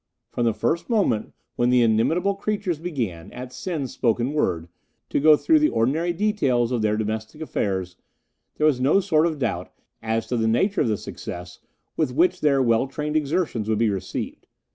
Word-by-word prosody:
"From 120 - -1
the 115 - +2
first 160 - -1
moment 200 - +1 0.3
when 120 0 +2
the 125 -1 +4
inimitable 160 - +2
creatures 200 -5 -2
began, 120 - -4
at 125 0 -8
Sen's 155 -8 -4
spoken 120 +3 0
word, 85 - 0 0.4
to - - +1
go 150 +1 +6
through 320 - +4
the 305 0 +3
ordinary 155 +10 +1
details 150 - +1
of 120 -3 0
their 105 0 +1
domestic 110 +5 -4
affairs, 95 - -2 0.6
there 155 - +1
was 140 -5 +3
no 140 +9 +4
sort 170 -4 +2
of 160 -2 -3
doubt 140 - -2 0.3
as 110 0 -1
to 125 - -2
the 110 -1 +1
nature 190 - +2
of - - +2
the 110 -2 0
success 90 -1 -8 0.4
with 150 -6 0
which 180 +3 +2
their 140 -3 +3
well 115 +2 +2
trained 150 +3 -4
exertions 150 - 0
would 110 - +2
be 110 -1 +2
received. 95 -2 -5
130 Hz, 185 wpm, -24 LUFS, 110-165 Hz, 0.6 s, go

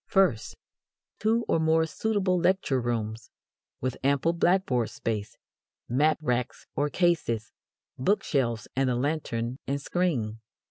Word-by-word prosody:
First, 175 - +2 0.6
two 225 +2 +2
or - - +2
more 160 0 +3
suitable 190 +1 0
lecture 175 -7 +2
rooms, 115 -2 -3 0.5
with 130 0 -2
ample 140 +4 +2
blackboard 170 - +2
space, 110 0 -4 0.5
map 150 +6 +3
racks 125 -3 -1
or 145 +2 +1
cases, 145 -10 +1 0.5
book 200 +11 +2
shelves, 120 -7 0
and 135 0 +2
a 125 - +1
lantern 125 -3 -2
and 140 +1 0
screen. 140 -10 -1
140 Hz, 125 wpm, -27 LUFS, 120-175 Hz, 0.6 s, more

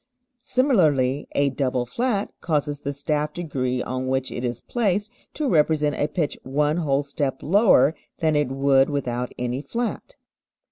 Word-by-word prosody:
Similarly, 160 - +2
a 140 -1 +2
double 130 -2 -1
flat 210 - -1
causes 145 -3 -1
the 140 - -3
staff 150 +1 -2
degree 130 -7 -2
on 130 +1 -3
which 130 0 -1
it 120 - -5
is 120 -1 -2
placed 210 -2 -1 0.2
to 300 - -1
represent 150 - +2
a 145 - 0
pitch 155 -4 -2
one 150 +4 0
whole 145 -4 +1
step 140 -1 -3
lower 160 - +5 0.2
than 155 -1 +1
it 150 -2 +2
would 135 0 +3
without 125 -4 -2
any 125 +2 -2
flat. 240 - -4
145 Hz, 150 wpm, -24 LUFS, 130-170 Hz, 0.2 s, lower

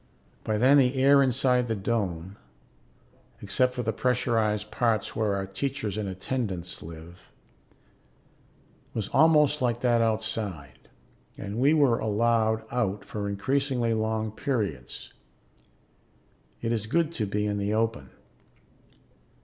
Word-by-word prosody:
By 110 -1 -1
then 135 +5 +6
the 130 0 +3
air 140 +1 +5
inside 125 -1 +2
the 115 - -1
dome 95 -4 -2 1.0
except 125 0 +1
for 125 - -2
the 110 0 -1
pressurized 110 -4 0
parts 115 -4 0
where 105 -2 0
our 95 0 -2
teachers 110 +1 -3
and 105 -2 -3
attendants 95 -2 -4
live 85 +2 -12 1.6
was 110 -3 -2
almost 150 -2 +4
like 120 -1 0
that 120 -2 +3
outside, 110 -9 -3 0.5
and 100 +3 -5
we 140 +5 +4
were 140 -6 +3
allowed 110 0 +1
out 105 -5 -1
for 100 -1 -4
increasingly 125 +3 0
long 110 0 -1
periods. 105 - -3 1.5
It 115 - 0
is 110 -2 -1
good 165 +5 +1
to 110 -10 -2
be 105 +1 -1
in 105 -1 -1
the 100 +2 -1
open. 110 - -1
110 Hz, 125 wpm, -27 LUFS, 100-125 Hz, 1.6 s, then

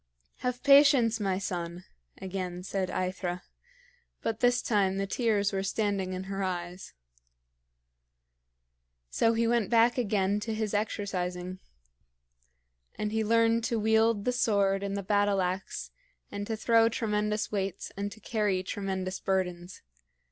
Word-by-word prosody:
"Have 250 -1 -3
patience, 275 -5 +6
my 195 -3 0
son," 175 -2 -4 0.4
again 185 -1 -5
said 190 0 -2
AEthra; 185 -1 -3 0.8
but 225 -1 -2
this 245 0 +3
time 195 -4 +1
the 195 - 0
tears 205 -2 0
were 195 - 0
standing 195 -2 -1
in 185 0 -4
her 195 +1 -4
eyes. 180 -1 -4 2.2
So 230 0 +3
he 230 +1 +1
went 235 -2 +1
back 235 +1 +4
again 205 -3 +1
to 220 +1 -3
his 215 -1 -2
exercising; 185 -3 -2 1.4
and 210 0 -3
he 220 0 0
learned 230 +1 +3
to 230 - 0
wield 220 -1 +2
the 250 - +2
sword 200 -5 +2
and 200 0 -3
the 200 - -3
battle 205 0 +2
ax 185 +1 -3 0.4
and 205 0 -5
to 225 - -2
throw 230 0 +4
tremendous 210 -2 -1
weights 195 -2 -3
and 200 +1 -3
to 220 - -12
carry 205 -4 0
tremendous 190 -1 -3
burdens. 180 -2 -2
205 Hz, 135 wpm, -29 LUFS, 190-225 Hz, 2.2 s, patience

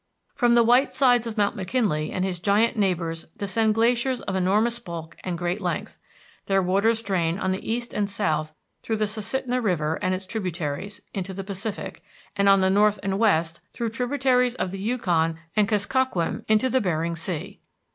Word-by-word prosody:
From 240 -2 +3
the 235 - +6
white 245 +4 +3
sides 245 -4 +4
of 225 -1 -6
McKinley 200 -5 0
and 185 - -1
his 180 -2 -3
giant 210 +6 +2
neighbors 175 -5 -1
descend 215 +2 +1
glaciers 240 +2 +2
of 195 - -4
enormous 210 +6 +2
bulk 170 -6 -8
and 180 -2 -3
great 175 +4 -2
length. 175 -3 -3 0.5
Their 195 -1 +3
waters 210 +5 +2
drain 175 -5 0
on 185 -2 -1
the 190 +3 -3
east 235 +1 -3
and 205 -1 0
south, 155 -6 -1 0.3
through 225 - -2
the 215 0 +1
Susitna 245 +4 -2
River 160 -7 0
and 185 0 +1
its 185 +1 -6
tributaries, 185 -1 -4
into 190 -1 -4
the 195 - -4
Pacific; 195 0 -5 0.3
and 200 0 +3
on 195 -1 +6
the 190 0 +3
north 210 +1 +4
and 195 0 -1
west, 170 -7 +2
through 235 -2 -2
tributaries 250 +1 +1
of 185 - -2
the 195 - -6
Yukon 175 -8 0 0.2
and 210 -1 +3
Kuskokwim, 210 -3 0
into 255 +4 +3
Bering 170 -2 -1
Sea. 165 -1 -4
200 Hz, 175 wpm, -25 LUFS, 180-230 Hz, 0.5 s, the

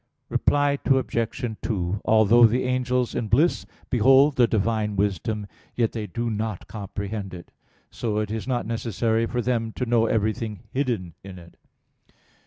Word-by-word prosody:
Reply 145 -1 +2
Obj. 120 -3 0
2: 100 -2 -2
Although 110 +2 +6
the 120 +3 0
angels 125 -1 0
in 110 - -2
bliss 145 +11 +2 0.2
behold 135 +4 +5
the 120 -2 +4
Divine 110 -1 0
wisdom, 100 +2 -1 0.3
yet 115 -2 +1
they 110 -2 -5
do 115 +1 -3
not 110 -2 -4
comprehend 100 -1 -5
it. 85 - -12 0.4
So 110 -3 -3
it 105 -1 -1
is 110 +1 -4
not 125 -6 -1
necessary 115 0 -1
for 120 0 -2
them 115 -2 -1
to 125 - -3
know 115 -1 +2
everything 110 -1 -1
hidden 120 - -2
in 95 -1 -9
it. 85 -1 -14
115 Hz, 150 wpm, -24 LUFS, 105-125 Hz, 0.4 s, Although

